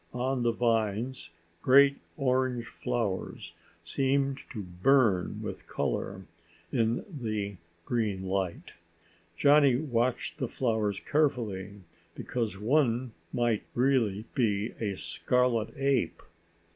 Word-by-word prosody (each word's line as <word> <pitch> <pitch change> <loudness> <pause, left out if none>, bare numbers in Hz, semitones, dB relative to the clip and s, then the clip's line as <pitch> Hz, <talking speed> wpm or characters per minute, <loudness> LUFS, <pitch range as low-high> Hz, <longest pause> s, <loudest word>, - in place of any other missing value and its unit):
On 130 +1 0
the 120 0 +3
vines 115 +1 0 0.3
great 140 +1 +6 0.2
orange 130 -3 +1
flowers 105 -7 -3 0.3
seemed 135 +8 0
to 110 -6 -5
burn 95 +2 +2
with - - -6
color - - -2 0.5
in 115 0 +1
the 110 - -4 0.3
green 105 -6 -1
light. 95 -2 -2 0.6
Johnny 145 -2 +6
watched 125 -3 -1
the - - -1
flowers 110 -5 0
carefully 105 -10 -1 0.3
because 115 -5 -3
one 125 +1 +1 0.2
might 120 -3 +1
really 120 -5 +2
be 110 -2 +1
a 100 -4 -2
scarlet 125 -1 +1
ape. 135 -2 0
120 Hz, 100 wpm, -29 LUFS, 105-130 Hz, 0.6 s, great